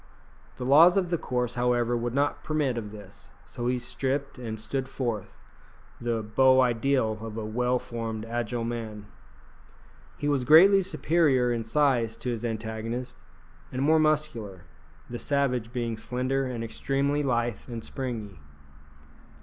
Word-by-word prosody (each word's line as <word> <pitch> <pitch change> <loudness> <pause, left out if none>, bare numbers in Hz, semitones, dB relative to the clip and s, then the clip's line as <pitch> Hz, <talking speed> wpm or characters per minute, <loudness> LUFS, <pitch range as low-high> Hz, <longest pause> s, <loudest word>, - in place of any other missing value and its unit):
The 125 - -4
laws 160 +8 +7
of 180 -3 0
the 170 - +2
course, 125 -2 -2
however, 120 -1 +1
would 120 +1 -2
not 145 +1 0
permit 150 -5 0
of 105 -3 -5
this, 100 -2 -13 0.2
so 120 - -5
he 125 0 +1
stripped 135 +3 -3
and 110 -3 -5
stood 130 +4 -3
forth, 120 -7 -4 0.6
the 115 -2 -1
beau 130 +5 +4
ideal 120 -2 +1
of 110 -1 -6
a 110 - -3
well 125 +3 +1
formed, 115 -2 -5
agile 120 0 -2
man. 110 -3 -5 1.1
He 145 - -2
was 140 -3 +1
greatly 185 +9 +7
superior 150 -7 +2
in 115 -1 -2
size 120 -2 +1
to 125 - -3
his 115 -1 -4
antagonist, 115 +2 -4 0.6
and 130 +1 -2
more 160 +2 +4
muscular, 150 - 0 0.4
the 120 - -6
savage 125 -5 0
being 120 -3 -2
slender 130 +3 -1
and 120 -2 -4
extremely 140 +5 -1
lithe 120 -5 0
and 115 -2 -6
springy. 115 - -5
125 Hz, 145 wpm, -27 LUFS, 115-135 Hz, 1.1 s, laws